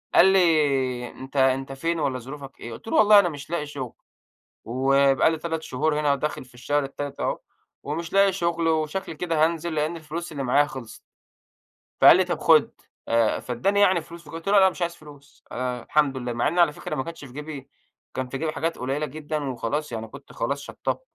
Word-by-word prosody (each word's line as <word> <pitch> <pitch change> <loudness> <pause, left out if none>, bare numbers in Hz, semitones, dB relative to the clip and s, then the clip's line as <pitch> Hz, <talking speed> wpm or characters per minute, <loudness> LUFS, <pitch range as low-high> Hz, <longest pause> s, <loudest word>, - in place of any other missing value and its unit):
قال - - +8
لي: 145 -9 +3
"أنت 135 +2 -12
أنت 135 0 +2
فين 165 +5 -2
والّا 130 -3 -1
ظروفك 135 +2 -10
إيه؟" 120 - -7
قُلت 115 - -12
له: - - -1
"والله 210 -1 +8
أنا 185 -3 +3
مش 145 -1 -9
لاقي 170 -3 -2
شغل 140 -5 -6 0.7
وبقى 135 +4 +3
لي 160 - -2
3 160 0 -3
شهور 150 +4 0
هنا 150 -1 +2
وداخل 140 -1 -3
في 125 - -21
الشهر 145 +4 -1
التالت 140 +1 -6
أهو، - - -1 0.4
ومش 165 +5 -4
لاقي 195 0 +5
شغل 170 -2 0
وشكلي 160 +2 -1
كده 165 -1 0
هانزل 170 0 -2
لإن 155 +3 0
الفلوس 165 +2 -6
اللي 140 -3 -4
معايا 140 +3 +4
خلصت." 130 -6 -9 1.1
فقال - - +9
لي: - - +4
"طب - - -3
خُد." - - +5 0.4
آآ 115 -1 +2
فادّاني 195 - 0
يعني 185 -4 +4
فلوس، 170 +1 -12
فقُلت 165 +3 -9
له: 200 - +2
"لأ - - +7
أنا 190 - +6
مش 180 - -11
عايز 170 0 -1
فلوس 145 -1 -16
أنا 125 -1 -3
الحمد 145 -3 +1
لله." 125 -1 -3
مع 120 - 0
إن 175 +3 0
على 165 -4 +5
فكرة - - -5
ما 130 - -2
كانش 165 -2 -8
في 125 - -13
جيبي 145 -1 -8 0.4
كان 130 -1 -3
في 135 - -4
جيبي 155 +1 -2
حاجات 165 +1 -2
قليلة 135 +4 -2
جدًا 150 +1 -4
وخلاص 135 +3 -3
يعني 115 -1 -5
كنت 140 +5 -13
خلاص 140 0 -2
شطّبت. 145 - -4
150 Hz, 205 wpm, -25 LUFS, 135-165 Hz, 1.1 s, فقال